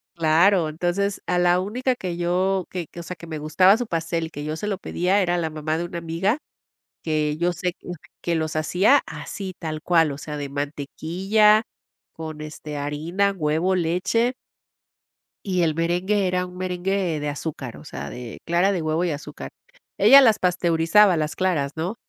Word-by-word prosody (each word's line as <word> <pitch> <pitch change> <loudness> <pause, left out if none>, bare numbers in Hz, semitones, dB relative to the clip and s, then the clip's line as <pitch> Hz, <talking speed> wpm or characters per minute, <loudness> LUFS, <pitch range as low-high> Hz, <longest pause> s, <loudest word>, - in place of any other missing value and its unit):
claro 165 +2 +3
entonces 175 +5 -1
a 180 - +1
la 175 0 +4
única 250 +6 -1
que 180 -6 -5
yo 180 +2 0
que 175 -4 -4
que, 170 - -9
o - - -9
sea, 180 +2 -6
que 170 0 -12
me 160 -1 -5
gustaba 185 +7 +4
su 245 -1 -3
pastel 165 -1 -2
que 145 - -7
yo 155 - -3
se 210 - -4
lo 200 -2 -1
pedía 190 +1 0
era 175 -1 +1
la 160 -2 -1
mamá 155 +1 -2
de 170 - -2
una 170 -1 -5
amiga 170 - 0 0.7
que 155 -1 0
yo 175 +1 +1
sé 175 +1 -2
que - - -14 0.3
que 170 -1 -1
los 160 -1 -2
hacía 190 - +4
así 190 -2 -6
tal 155 -2 -4
cual, 165 -4 +3
o - - -8
sea, 150 -1 -6
de 140 -1 -5
mantequilla 175 +10 +1 0.5
con, 155 -1 -7
este, 150 -1 -7
harina, 160 +8 0
huevo, 160 +3 +1
leche 185 +8 +1 1.1
y 185 -2 0
el 160 -2 +1
merengue 180 +4 +1
era 180 0 0
un 180 0 -11
merengue 185 -2 -1
de 150 0 -2
azúcar, 145 -4 -5
o - - -12
sea, - - -6
de 125 -2 -8
clara 175 +4 +2
de 180 - -1
huevo 155 +2 0
y 170 - 0
azúcar. 145 - -7 0.5
Ella 270 +8 +8
las 225 -5 +4
pasteurizaba 175 +2 +3
las 155 -1 -2
claras, 160 -7 0
¿no?, 175 +7 -3
175 Hz, 185 wpm, -23 LUFS, 155-190 Hz, 1.1 s, Ella